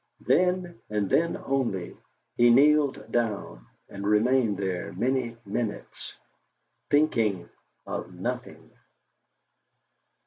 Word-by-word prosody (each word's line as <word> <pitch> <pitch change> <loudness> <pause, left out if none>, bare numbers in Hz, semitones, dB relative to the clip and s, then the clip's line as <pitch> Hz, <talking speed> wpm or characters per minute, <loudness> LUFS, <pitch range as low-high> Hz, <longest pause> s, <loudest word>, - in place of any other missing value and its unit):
Then, 180 -7 +1
and 105 -1 0
then 170 0 +2
only, 120 -10 -2 0.4
he 120 0 +5
kneeled 140 -3 +4
down, 105 - -2 0.2
and 100 0 -8
remained 110 +1 +3
there 95 0 -3
many 120 +3 -1
minutes, 105 +1 -5 0.7
thinking 115 - +2 0.4
of - - -5
nothing. - - -6
115 Hz, 90 wpm, -27 LUFS, 100-135 Hz, 0.7 s, he